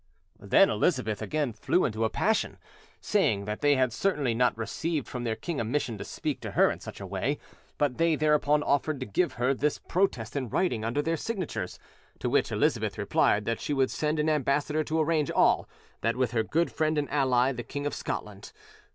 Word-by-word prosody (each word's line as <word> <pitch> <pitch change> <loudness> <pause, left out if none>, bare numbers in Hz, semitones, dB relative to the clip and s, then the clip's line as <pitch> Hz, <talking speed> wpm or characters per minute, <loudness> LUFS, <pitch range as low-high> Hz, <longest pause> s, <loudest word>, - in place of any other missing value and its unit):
Then 105 - +4
Elizabeth 125 - 0
again 150 -6 -1
flew 150 +11 +1
into 110 -1 0
a - - +1
passion, 220 - 0 0.4
saying 110 - +1
that 105 +1 -4
they 145 -1 +4
had 130 -3 +1
certainly 145 - 0
not 125 0 +2
received 155 +7 -2
from 125 -1 -5
their 110 -1 0
king 145 +7 -4
a - - 0
mission 115 -2 -2
to - - -4
speak - - -4
to - - -5
her - - +4
in - - -6
such - - -9
a 100 - -6
way; 100 +10 -1 0.4
but 145 -2 0
they 165 -1 +3
thereupon 150 -1 +2
offered 145 0 0
to - - -2
give 165 - 0
her 125 +3 +1
this 145 +2 0
protest 135 - -1
in 130 -4 -2
writing 120 - 0
under 120 +6 0
their 165 +1 0
signatures; 195 -2 -4 0.4
to - - -2
which - - +2
Elizabeth - - 0
replied 105 0 +2
that 115 +1 -2
she 145 - -2
would 135 -2 +2
send 155 0 -1
an 150 +1 +1
ambassador 150 +1 +1
to 160 +2 -1
arrange 155 -2 +1
all - - +3 0.3
that 115 - +1
with 125 -2 0
her 115 -2 +1
good 165 +9 0
friend 155 0 0
and 145 -1 0
ally, 130 -2 +3
the 120 -2 -5
King 145 +4 -5
of 145 - -1
Scotland. 100 -1 -5
140 Hz, 205 wpm, -28 LUFS, 115-155 Hz, 0.4 s, Then